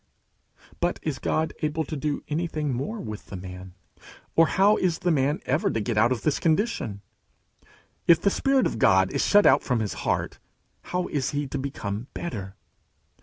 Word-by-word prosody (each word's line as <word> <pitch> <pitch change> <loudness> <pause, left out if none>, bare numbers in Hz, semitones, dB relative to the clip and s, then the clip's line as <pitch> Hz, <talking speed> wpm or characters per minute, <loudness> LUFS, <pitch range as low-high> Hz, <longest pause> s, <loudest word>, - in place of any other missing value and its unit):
But - - 0
is - - -2
God 160 0 0
able 155 +1 0
to 155 - -5
do 150 0 -2
anything 155 -2 -2
more 145 - -3
with 110 - -7
the - - -8
man? 90 0 -9 0.6
Or 165 0 +6
how 200 +5 +4
is 175 -3 +1
the 175 0 0
man 145 +3 +1
ever 200 - +1
to 115 - -1
get 110 +2 -2
out 110 +3 +4
of 125 - -1
this 155 - +1
condition? 160 - 0 1.1
If 170 -1 +7
the 200 - +2
Spirit 270 +2 +2
of 115 - -2
God 95 -2 +4
is - - +1
shut 205 0 +5
out - - +6
from 125 -3 0
his 105 -2 -2
heart, - - -1 0.5
how 180 0 -2
is 140 -3 -1
he 145 - 0
to 140 - -3
become 115 -5 -4
better? 100 - -5
145 Hz, 180 wpm, -26 LUFS, 110-170 Hz, 1.1 s, If